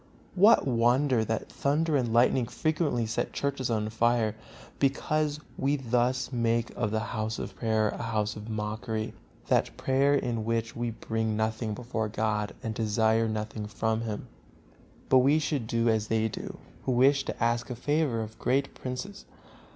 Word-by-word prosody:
What 205 Hz, +5 st, +6 dB
wonder 125 Hz, 0 st, +3 dB
that 110 Hz, 0 st, -2 dB
thunder 150 Hz, +3 st, +1 dB
and 125 Hz, -4 st, +1 dB
lightning 120 Hz, +1 st, +3 dB
frequently 155 Hz, -6 st, 0 dB
set 110 Hz, -, -2 dB
churches 140 Hz, -3 st, -2 dB
on 110 Hz, -2 st, 0 dB
fire, 115 Hz, -1 st, +2 dB, 0.4 s
because 150 Hz, +2 st, +1 dB, 0.2 s
we 140 Hz, +2 st, +2 dB
thus 125 Hz, -1 st, 0 dB
make 115 Hz, -1 st, 0 dB
of 110 Hz, -3 st, 0 dB
the 110 Hz, +1 st, -1 dB
House 110 Hz, 0 st, -2 dB
of -, -, -6 dB
Prayer 110 Hz, -2 st, +1 dB
a -, -, -5 dB
house 110 Hz, -2 st, -1 dB
of 105 Hz, +1 st, -8 dB
mockery, 110 Hz, +1 st, -3 dB
and -, -, -6 dB
call -, -, -26 dB
that -, -, +2 dB
prayer 135 Hz, +2 st, +3 dB
in 120 Hz, -5 st, -1 dB
which 115 Hz, 0 st, -1 dB
we 120 Hz, 0 st, -2 dB
bring 110 Hz, -1 st, -2 dB
nothing 110 Hz, 0 st, -1 dB
before 115 Hz, -2 st, -3 dB
God 105 Hz, -1 st, -1 dB
and 110 Hz, -, -2 dB
desire 110 Hz, +1 st, +2 dB
nothing 110 Hz, 0 st, -4 dB
from 110 Hz, +1 st, -1 dB
Him. 110 Hz, -3 st, -4 dB, 0.8 s
But 130 Hz, -, +6 dB
we 140 Hz, +4 st, +4 dB
should 150 Hz, -6 st, -1 dB
do 115 Hz, +1 st, +1 dB
as 110 Hz, -1 st, +2 dB
they 110 Hz, 0 st, +1 dB
do 110 Hz, -, -6 dB, 0.3 s
who 130 Hz, -, +1 dB
wish 135 Hz, +3 st, +4 dB
to -, -, -4 dB
ask 120 Hz, +1 st, +1 dB
a 125 Hz, -, -3 dB
favor 145 Hz, -2 st, 0 dB
of 110 Hz, 0 st, -7 dB
great 135 Hz, +2 st, +1 dB
princes. 130 Hz, +11 st, -6 dB
115 Hz, 170 wpm, -28 LUFS, 110-130 Hz, 0.8 s, What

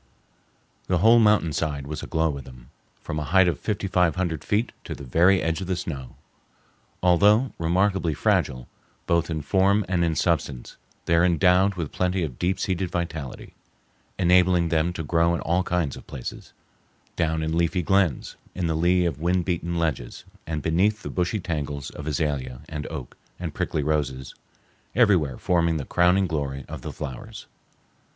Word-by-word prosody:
The 90 Hz, -, +2 dB
whole 115 Hz, +6 st, +6 dB
mountainside 80 Hz, -9 st, +2 dB
was 75 Hz, +1 st, -5 dB
aglow 80 Hz, -1 st, 0 dB
with 70 Hz, -3 st, -7 dB
them, 65 Hz, 0 st, -14 dB, 0.3 s
from 75 Hz, -, -3 dB
a -, -, -2 dB
height 90 Hz, +5 st, +4 dB
of 85 Hz, -, 0 dB
fifty 105 Hz, -2 st, -2 dB
five 90 Hz, -4 st, +2 dB
hundred 85 Hz, -5 st, -2 dB
feet 110 Hz, +4 st, 0 dB
to -, -, -6 dB
the -, -, -10 dB
very 90 Hz, +9 st, +3 dB
edge 80 Hz, +2 st, -1 dB
of 95 Hz, -, -5 dB
the 95 Hz, -, 0 dB
snow. 70 Hz, -7 st, -6 dB, 0.9 s
Although 105 Hz, +8 st, +4 dB
remarkably 90 Hz, -1 st, +1 dB
fragile, 65 Hz, -2 st, 0 dB, 0.4 s
both 85 Hz, 0 st, +1 dB
in 80 Hz, -3 st, -3 dB
form 100 Hz, +3 st, +2 dB
and 90 Hz, -2 st, +1 dB
in 80 Hz, -2 st, +1 dB
substance, 75 Hz, -6 st, -1 dB, 0.3 s
they -, -, +1 dB
are 85 Hz, +1 st, +5 dB
endowed 90 Hz, +3 st, +3 dB
with 85 Hz, -5 st, -4 dB
plenty 90 Hz, 0 st, 0 dB
of 70 Hz, -6 st, -5 dB
deep 90 Hz, +2 st, 0 dB
seated 95 Hz, -1 st, -1 dB
vitality, 85 Hz, -6 st, -5 dB, 0.6 s
enabling 90 Hz, -1 st, +4 dB
them 80 Hz, +1 st, +1 dB
to 80 Hz, -, -4 dB
grow 85 Hz, +2 st, +2 dB
in -, -, -4 dB
all 85 Hz, +2 st, +1 dB
kinds 90 Hz, -6 st, -1 dB
of -, -, -13 dB
places—down 80 Hz, +4 st, -6 dB
in 80 Hz, +1 st, -1 dB
leafy 85 Hz, +2 st, +1 dB
glens, 95 Hz, -5 st, +1 dB, 0.2 s
in 90 Hz, -, -2 dB
the 80 Hz, -, 0 dB
lee 90 Hz, +3 st, +2 dB
of 80 Hz, -3 st, -2 dB
wind 90 Hz, +1 st, +1 dB
beaten 85 Hz, -1 st, -2 dB
ledges, 75 Hz, -8 st, -3 dB, 0.2 s
and 75 Hz, -2 st, -3 dB
beneath 100 Hz, +6 st, +1 dB
the -, -, -5 dB
brushy 90 Hz, +4 st, -1 dB
tangles 75 Hz, -5 st, -4 dB
of 75 Hz, -, -8 dB
azalea, 70 Hz, -4 st, -2 dB
and 75 Hz, -2 st, -5 dB
oak, 75 Hz, -6 st, -7 dB, 0.2 s
and -, -, -4 dB
prickly 75 Hz, -, -2 dB
roses—everywhere 75 Hz, -, -1 dB
forming 85 Hz, -2 st, +1 dB
the 70 Hz, -, -4 dB
crowning 90 Hz, +2 st, +3 dB
glory 70 Hz, -5 st, -3 dB
of -, -, -7 dB
the -, -, -6 dB
flowers. 65 Hz, -3 st, -8 dB
85 Hz, 165 wpm, -25 LUFS, 75-90 Hz, 0.9 s, whole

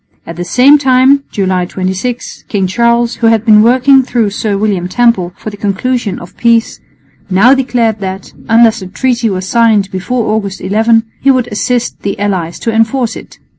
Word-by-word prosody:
At 165 Hz, -, -8 dB
the 175 Hz, -, -5 dB
same 265 Hz, +10 st, +4 dB
time 265 Hz, +1 st, +3 dB
(July 185 Hz, -3 st, -1 dB
26) 190 Hz, +7 st, -5 dB
King 200 Hz, -3 st, -1 dB
Charles, 235 Hz, +4 st, 0 dB
who 230 Hz, -, +1 dB
had 225 Hz, -1 st, +2 dB
been 210 Hz, -2 st, +6 dB
working 260 Hz, +4 st, +4 dB
through 235 Hz, -5 st, -1 dB
Sir 205 Hz, 0 st, -2 dB
William 195 Hz, -4 st, -1 dB
Temple 195 Hz, -4 st, +1 dB
for 215 Hz, -, -7 dB
the 205 Hz, -, -11 dB
conclusion 210 Hz, +1 st, -2 dB
of 175 Hz, -, -12 dB
peace, 230 Hz, -1 st, +1 dB, 0.5 s
now 200 Hz, +8 st, +4 dB
declared 240 Hz, -5 st, 0 dB
that, 190 Hz, -1 st, -6 dB, 0.2 s
unless 230 Hz, 0 st, +4 dB
the 190 Hz, -, -8 dB
treaty 240 Hz, +3 st, -1 dB
was 185 Hz, -1 st, -4 dB
signed 220 Hz, -4 st, +2 dB
before 215 Hz, +5 st, -2 dB
August 200 Hz, -3 st, -3 dB
11, 225 Hz, +3 st, +1 dB, 0.2 s
he 275 Hz, -, +2 dB
would 255 Hz, -2 st, +1 dB
assist 240 Hz, +3 st, -2 dB
the 200 Hz, -, -3 dB
allies 185 Hz, -5 st, -3 dB
to 230 Hz, -, -3 dB
enforce 225 Hz, +2 st, 0 dB
it. -, -, -12 dB
225 Hz, 175 wpm, -11 LUFS, 195-245 Hz, 0.5 s, been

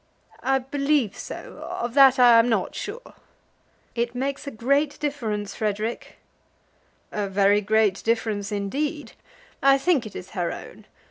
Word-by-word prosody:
"I 270 Hz, 0 st, +2 dB
believe 275 Hz, -3 st, 0 dB
so. -, -, -8 dB
Of 240 Hz, 0 st, -3 dB
that 270 Hz, -1 st, +7 dB
I 240 Hz, -2 st, +7 dB
am 230 Hz, +1 st, +3 dB
not 225 Hz, -, 0 dB
sure." 470 Hz, +5 st, -7 dB, 0.8 s
"It 235 Hz, 0 st, -2 dB
makes 275 Hz, +3 st, -3 dB
a -, -, -1 dB
great 280 Hz, +5 st, 0 dB
difference, 220 Hz, -9 st, -3 dB
Frederic." 215 Hz, +2 st, -3 dB, 0.9 s
"A 205 Hz, -1 st, -2 dB
very 200 Hz, +1 st, +3 dB
great 210 Hz, -1 st, +2 dB
difference 220 Hz, -3 st, -1 dB
indeed. 280 Hz, +10 st, -3 dB, 0.5 s
I 275 Hz, 0 st, +6 dB
think 275 Hz, -5 st, +1 dB
it 210 Hz, -, -13 dB
is 180 Hz, -, -8 dB
her 175 Hz, -4 st, -2 dB
own. -, -, -10 dB
235 Hz, 140 wpm, -24 LUFS, 210-275 Hz, 0.9 s, that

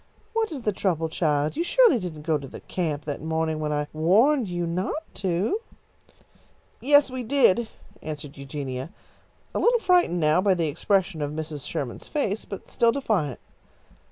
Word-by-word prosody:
"What 445 Hz, -3 st, 0 dB
is 275 Hz, -6 st, -6 dB
the 210 Hz, -, +1 dB
trouble, 165 Hz, -4 st, 0 dB
child? 150 Hz, -2 st, 0 dB
You 330 Hz, -, 0 dB
surely 465 Hz, -, +5 dB
didn't 165 Hz, -6 st, -6 dB
go 155 Hz, -1 st, +1 dB
to 140 Hz, -, -8 dB
the -, -, -10 dB
camp 155 Hz, -5 st, -3 dB
that 145 Hz, -2 st, -4 dB
morning 160 Hz, 0 st, -1 dB
when 150 Hz, -1 st, -2 dB
I 150 Hz, 0 st, 0 dB
warned 215 Hz, -, +3 dB
you 175 Hz, -1 st, -2 dB
not 185 Hz, -, -2 dB, 0.2 s
to?" 190 Hz, -, 0 dB, 1.2 s
"Yes, 285 Hz, +1 st, +5 dB
we 255 Hz, 0 st, -4 dB
did," 235 Hz, -3 st, +3 dB, 0.3 s
answered 150 Hz, -2 st, -6 dB
Eugenia, 135 Hz, -1 st, -5 dB, 0.6 s
a -, -, -1 dB
little 475 Hz, 0 st, +4 dB
frightened 360 Hz, -, +3 dB
now 155 Hz, +2 st, +3 dB
by 195 Hz, -1 st, +3 dB
the 165 Hz, -2 st, 0 dB
expression 180 Hz, +2 st, 0 dB
of 145 Hz, -, -1 dB
Mrs. 150 Hz, -2 st, -5 dB
Sherman's 130 Hz, -4 st, -5 dB
face, 220 Hz, -8 st, -1 dB
but 195 Hz, -, -8 dB
still 235 Hz, -1 st, +3 dB
defiant. 205 Hz, -, -1 dB
175 Hz, 165 wpm, -25 LUFS, 150-235 Hz, 1.2 s, surely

